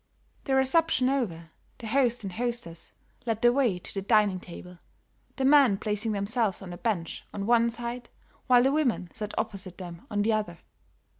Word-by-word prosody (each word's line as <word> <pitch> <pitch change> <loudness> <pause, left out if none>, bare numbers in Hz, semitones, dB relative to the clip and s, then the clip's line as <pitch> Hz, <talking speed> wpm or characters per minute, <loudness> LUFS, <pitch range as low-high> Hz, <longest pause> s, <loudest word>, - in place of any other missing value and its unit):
The 270 - +1
reception 265 -1 +3
over, 170 - -2 0.3
the 235 - -10
host 240 0 +1
and 190 -2 -5
hostess 235 -7 -4 0.4
led 225 0 -1
the 240 0 +6
way 245 -9 +2
to 180 - -10
the 195 - -3
dining 205 -2 +3
table, 180 0 -11 0.6
the 265 - -1
men 270 -7 +6
placing 210 +2 -1
themselves 205 0 -1
on 180 - -8
the 175 - -7
bench 185 -8 -3
on 200 -1 -4
one 235 +1 +4
side 240 +1 -6 0.4
while 245 -2 +6
the 270 - +3
women 255 - 0
sat 210 -1 -6
opposite 195 -5 -3
them 175 -2 -9
on 205 -2 0
the 220 +1 +2
other. 210 -6 -2
220 Hz, 175 wpm, -27 LUFS, 195-245 Hz, 0.6 s, the